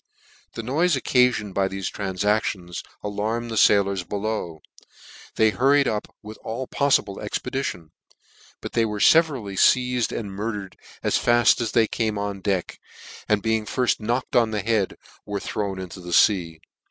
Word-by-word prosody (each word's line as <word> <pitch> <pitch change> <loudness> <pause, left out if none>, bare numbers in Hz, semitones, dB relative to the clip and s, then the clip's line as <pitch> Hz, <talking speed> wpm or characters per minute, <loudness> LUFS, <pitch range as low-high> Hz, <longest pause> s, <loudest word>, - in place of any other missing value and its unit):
The 115 - -6
noife 145 +5 +1
occafioned 125 -6 +2
by 95 0 +1
thefe 95 0 -4
transactions 95 -2 -1 0.2
a - - -3
lanned 110 +3 -3
the - - -3
failors 100 -3 +3
below, 100 -4 -4 0.7
they 110 -1 +4
hurried 140 +4 +3
up 105 -1 -2 0.2
with 110 +1 -10
all 120 +4 -4
poffible 140 -8 +1
expedition, 105 - -4 0.7
but - - -7
they 115 - +2
were 105 -2 -2
Teverally 140 -9 +3
feiaed 125 +3 +3
and 105 -4 -4
murdered 100 -1 -5 0.3
as - - +2
faft 120 0 +4
as 115 -3 -2
they 115 - +4
came 110 -1 -2
on 100 -1 -4
deck, 95 -3 -2 0.5
and 105 -1 +2
being 110 -1 0
firft 125 +2 0
knocked 120 +4 -2
on 120 -2 +4
the 105 -2 -2
head, 105 -2 0 0.3
were 100 -1 -4
thrown 100 -1 -3
into 95 0 -7
the 90 -1 -7
fea. 85 -5 +3
105 Hz, 155 wpm, -24 LUFS, 100-120 Hz, 0.7 s, they